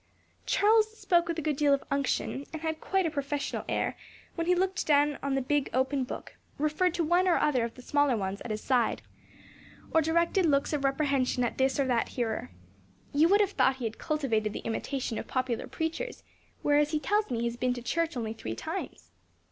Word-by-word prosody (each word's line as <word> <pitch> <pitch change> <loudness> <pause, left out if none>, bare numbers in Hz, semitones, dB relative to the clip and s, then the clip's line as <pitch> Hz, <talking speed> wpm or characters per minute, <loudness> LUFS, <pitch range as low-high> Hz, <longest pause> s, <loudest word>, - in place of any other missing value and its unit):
Charles 435 +1 +3
spoke 345 -4 +2
with 335 -1 -2
a 320 - -3
good 300 -2 0
deal 285 -1 +4
of 275 - -8
unction, 275 0 -1
and 320 0 -7
had 320 -1 -2
quite 385 -1 +1
a 325 - 0
professional 285 -1 -2
air - - 0 0.4
when 335 -1 -3
he 360 - +4
looked 375 +1 0
down 290 -1 +3
on 275 0 -1
the 270 - 0
big 290 +1 0
open 265 +1 +1
book, - - -8 0.2
referred 310 +4 +1
to 340 - +1
one 350 +4 +3
or 350 - +4
other 260 -5 +2
of 230 0 -4
the 250 - -12
smaller 285 -4 +2
ones 195 0 -3
at - - -7
his 215 0 -3
side, 245 -4 +1 0.9
or 320 - +5
directed 335 +3 +2
looks 280 0 +2
of 290 -2 -1
reprehension 270 -2 +1
at 240 - -2
this 265 +1 +2
or 275 - +3
that 245 -3 +1
hearer. 230 -3 -2 0.6
You 300 +3 +5
would 405 +2 +5
have 400 -1 +1
thought 265 -8 +3
he 255 -3 -5
had 220 0 -4
cultivated 225 -9 0
the - - -7
imitation 235 +1 -2
of - - -7
popular 255 -3 -2
preachers, 330 +10 -4 0.4
whereas 290 0 +3
he 305 -1 0
tells 415 +4 +1
me 235 -2 -1
he - - 0
has 235 0 -2
been 250 0 +1
to 245 - -6
church 335 +1 -1
only 220 -2 -3
three 110 - -5
times. 85 -6 -6
285 Hz, 210 wpm, -29 LUFS, 250-325 Hz, 0.9 s, or